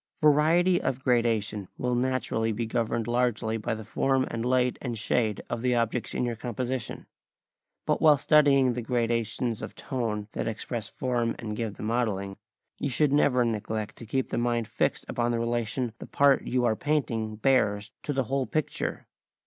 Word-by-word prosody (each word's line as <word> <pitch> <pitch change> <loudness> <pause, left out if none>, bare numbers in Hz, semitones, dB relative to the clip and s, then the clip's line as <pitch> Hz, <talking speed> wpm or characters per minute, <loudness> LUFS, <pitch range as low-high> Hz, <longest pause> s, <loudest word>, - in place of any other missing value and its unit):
] - - -45
Variety 160 +4 +4
of 130 0 -2
gradation 115 -5 +1
will 125 0 -1
naturally 120 -3 0
be 115 +2 -2
governed 115 0 -1
largely 120 -2 0
by 110 - -2
the 110 - -7
form 135 +4 +1
and 115 0 -3
light 125 0 +1
and 120 -3 -3
shade 110 -1 0
of 120 - -3
the 125 0 +2
objects 115 0 -1
in - - 0
your 120 -1 -2
composition. 125 +1 -4 0.8
But - - +1
while 150 -2 +7
studying 140 -3 +4
the 120 - -3
gradations 115 -1 -1
of - - -7
tone 110 -6 -3
that - - -3
express 115 0 -4
form 120 -2 -1
and 110 -3 -5
give 110 -2 -3
the - - -8
modelling, 105 -4 -1 0.4
you 140 - -1
should 145 +2 +2
never 125 -4 +4
neglect 110 -1 -3
to 115 - -10
keep 130 +3 -1
the - - -1
mind 120 -2 0
fixed - - -1
upon 120 0 -1
the 120 -1 0
relation 120 0 -1
the - - -8
part 140 -1 +3
you 125 -1 +1
are 110 -2 +2
painting 115 -7 -1
bears 105 -4 +1
to - - -3
the 135 -2 +1
whole 135 +2 -1
picture. 155 -2 -2
120 Hz, 180 wpm, -27 LUFS, 110-130 Hz, 0.8 s, while